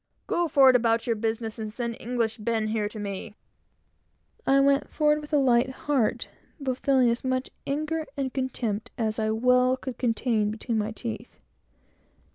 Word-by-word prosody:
"Go 345 0 0
forward 270 -4 +6
about 230 -1 +2
your 230 - +1
business, 225 0 -3
and 215 -1 -4
send 235 +1 -3
English 230 -2 -1
Ben 220 0 -1
here 215 -1 -1
to 215 - -10
me!" 205 0 -5 1.1
I 275 0 +5
went 275 0 +3
forward 300 -1 +2
with 295 - -11
a 300 - +4
light 255 -2 +3
heart, 260 -3 -1 0.3
but 260 -3 -2
feeling 260 -3 +3
as 235 - -2
angry, 260 0 -1 0.2
and 285 +2 -1 0.3
as 275 - 0
much 260 - -4
contempt 235 -5 -2
as 220 -1 -1
I 215 - 0
could 220 +2 -2
well 250 +1 +4
contain 235 -4 0
between 220 +1 -2
my 210 +1 -1
teeth. 225 +1 -7
240 Hz, 170 wpm, -26 LUFS, 220-260 Hz, 1.1 s, forward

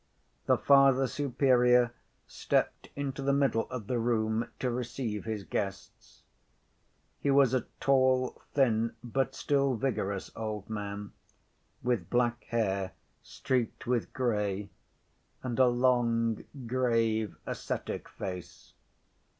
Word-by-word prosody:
The - - +5
Father 135 -1 +5
Superior 125 -3 +3 0.3
stepped - - -1
into 140 -1 -3
the 140 0 +1
middle 135 -5 +1
of 125 -4 -5
the 120 +2 -1
room 115 -1 0
to 125 - -1
receive 120 -3 -3
his 110 -2 -3
guests. 95 0 -5 1.0
He 140 - -1
was 135 -2 +5
a 130 - 0
tall, 130 -1 +2
thin, 115 -4 +2
but 130 +2 -1
still 140 -2 +1
vigorous 100 -5 -2
old 110 -3 -4
man, 105 -1 -5 0.7
with 120 -8 0
black 120 -1 +1
hair 100 -5 -1 0.3
streaked 125 -4 -2
with 120 -2 0
gray, 105 -5 -1 0.7
and 125 -1 -3
a 130 - +7
long, 120 -2 +2 0.2
grave, 115 -4 +1
ascetic - - -4
face. 90 -3 -7
120 Hz, 110 wpm, -30 LUFS, 110-130 Hz, 1.0 s, a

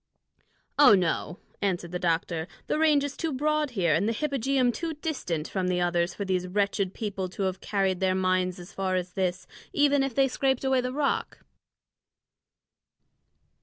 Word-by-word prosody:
"Oh, 255 -8 +9
no," 180 0 -1 0.2
answered 175 -3 -1
the 180 - -3
doctor; 165 -1 -1 0.2
"the - - -1
range 305 -3 +4
is 285 -1 -4
too 325 - -2
broad 300 +2 0
here 170 -4 +3
and 195 +8 +2
the - - 0
hypogeum 270 -2 +1
too 325 +5 -4
distant 255 - -3
from 185 -2 -2
the 180 -1 +1
others 175 0 0
for 200 - -4
these 185 -1 -1
wretched 200 0 0
people 200 -4 -3
to 195 - -4
have 190 0 -2
carried 195 -3 0
their 190 -1 +2
mines 185 -1 +1
as 175 +1 -11
far 190 -1 -1
as 180 -1 -3
this, 185 -1 -1 0.3
even 285 -1 +3
if 270 -3 -2
they 270 -1 +4
scraped 265 0 0
away 265 -1 +2
the 250 0 -3
rock." 280 +1 -2
195 Hz, 170 wpm, -27 LUFS, 180-270 Hz, 0.3 s, Oh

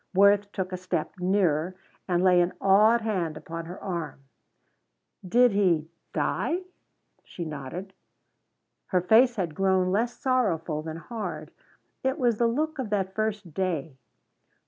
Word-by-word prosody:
Worth 200 +1 +5
took 190 -2 -3
a 185 - -3
step 185 0 -2
nearer 180 -2 +1 0.3
and 175 -1 +1
lay 180 -1 +5
an 175 +1 0
awed 210 +4 +5
hand 180 -8 -2
upon 165 +1 -7
her 175 +3 -8
arm. 170 -6 -5 1.0
"Did 240 +6 +4
he 175 -6 +1 0.2
die?" 355 +3 -1 0.6
She 170 - -7
nodded. 155 +6 -6 0.9
Her 180 -2 +1
face 235 +7 +5
had 175 -7 -2
grown 190 0 +2
less 235 +5 0
sorrowful 175 - 0
than 160 0 -6
hard. 170 -6 -6 0.5
It 265 +2 0
was 240 -6 +1
the 235 - +4
look 305 +5 -1
of 250 -5 -3
that 190 -2 -1
first 210 -5 -3
day. 160 -7 -2
190 Hz, 140 wpm, -27 LUFS, 170-215 Hz, 1.0 s, Worth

